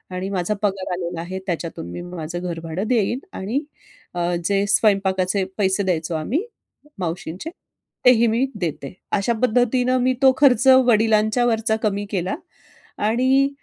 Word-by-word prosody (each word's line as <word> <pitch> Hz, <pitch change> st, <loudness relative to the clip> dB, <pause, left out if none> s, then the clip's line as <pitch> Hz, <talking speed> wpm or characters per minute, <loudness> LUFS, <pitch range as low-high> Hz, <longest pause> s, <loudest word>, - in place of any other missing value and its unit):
आणि 185 Hz, +1 st, -3 dB
माझा 190 Hz, +1 st, -1 dB
पगार 195 Hz, -2 st, -1 dB
आलेला 175 Hz, -1 st, -4 dB
आहे. 185 Hz, +3 st, -5 dB
त्याच्यातून 165 Hz, -, -4 dB
मी -, -, -6 dB
माझं 175 Hz, -1 st, -6 dB
घरभाडं 170 Hz, +2 st, -4 dB
देईन 235 Hz, 0 st, +1 dB
आणि 215 Hz, +8 st, -2 dB, 0.6 s
अ, 175 Hz, 0 st, 0 dB
जे 200 Hz, +1 st, +2 dB
स्वयंपाकाचे 195 Hz, -2 st, +2 dB
पैसे 195 Hz, -1 st, +1 dB
द्यायचो 170 Hz, -3 st, -1 dB
आम्ही 230 Hz, -, -1 dB, 0.6 s
मावशींचे 180 Hz, -, -4 dB, 0.6 s
तेही 235 Hz, -2 st, +6 dB
मी 230 Hz, +4 st, +2 dB, 0.2 s
देते." 155 Hz, -5 st, -4 dB, 0.2 s
अशा 200 Hz, +4 st, 0 dB
पद्धतीनं 250 Hz, +1 st, +2 dB
मी 255 Hz, +1 st, +3 dB
तो 265 Hz, -1 st, +7 dB
खर्च 265 Hz, -3 st, +4 dB, 0.2 s
वडिलांच्यावरचा 220 Hz, 0 st, +2 dB
कमी 205 Hz, -1 st, 0 dB
केला. 185 Hz, -2 st, -1 dB, 0.7 s
आणि 260 Hz, +4 st, +3 dB
200 Hz, 130 wpm, -22 LUFS, 175-235 Hz, 0.7 s, तो